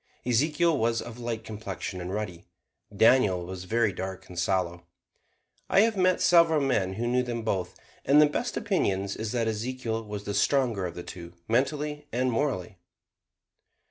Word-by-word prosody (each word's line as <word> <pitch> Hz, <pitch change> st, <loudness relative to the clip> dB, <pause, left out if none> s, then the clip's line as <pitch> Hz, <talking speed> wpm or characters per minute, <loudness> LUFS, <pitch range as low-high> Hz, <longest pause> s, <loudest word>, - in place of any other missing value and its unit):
Ezekiel 150 Hz, +7 st, +2 dB
was 115 Hz, +1 st, +1 dB
of 120 Hz, 0 st, -8 dB
light 115 Hz, -2 st, -4 dB
complexion 100 Hz, -4 st, -6 dB
and 90 Hz, +1 st, -5 dB
ruddy; 95 Hz, -5 st, -5 dB, 0.5 s
Daniel 105 Hz, -5 st, +4 dB
was 95 Hz, 0 st, -7 dB
very 110 Hz, 0 st, +1 dB
dark 95 Hz, 0 st, -6 dB
and 90 Hz, -1 st, -6 dB
sallow. 85 Hz, -1 st, -1 dB, 0.8 s
I 195 Hz, -, +5 dB
have 225 Hz, 0 st, +2 dB
met 185 Hz, -1 st, +2 dB
several 170 Hz, -3 st, +5 dB
men 105 Hz, -9 st, +1 dB
who 115 Hz, +5 st, -3 dB
knew 125 Hz, +1 st, +2 dB
them 120 Hz, -2 st, -4 dB
both, 95 Hz, -5 st, -2 dB, 0.3 s
and 140 Hz, +2 st, +5 dB
the 150 Hz, -, +8 dB
best 150 Hz, -, -2 dB
opinion 95 Hz, -1 st, 0 dB
is 105 Hz, +2 st, -4 dB
that 115 Hz, -2 st, 0 dB
Ezekiel 115 Hz, +1 st, -3 dB
was 105 Hz, -1 st, -6 dB
the 100 Hz, -, -4 dB
stronger 120 Hz, -7 st, +1 dB
of 85 Hz, -, -8 dB
the 90 Hz, -, -6 dB
two, 85 Hz, -1 st, -9 dB
mentally 150 Hz, +5 st, -1 dB
and 125 Hz, +1 st, 0 dB
morally. 110 Hz, -8 st, -2 dB
115 Hz, 165 wpm, -27 LUFS, 95-130 Hz, 0.8 s, the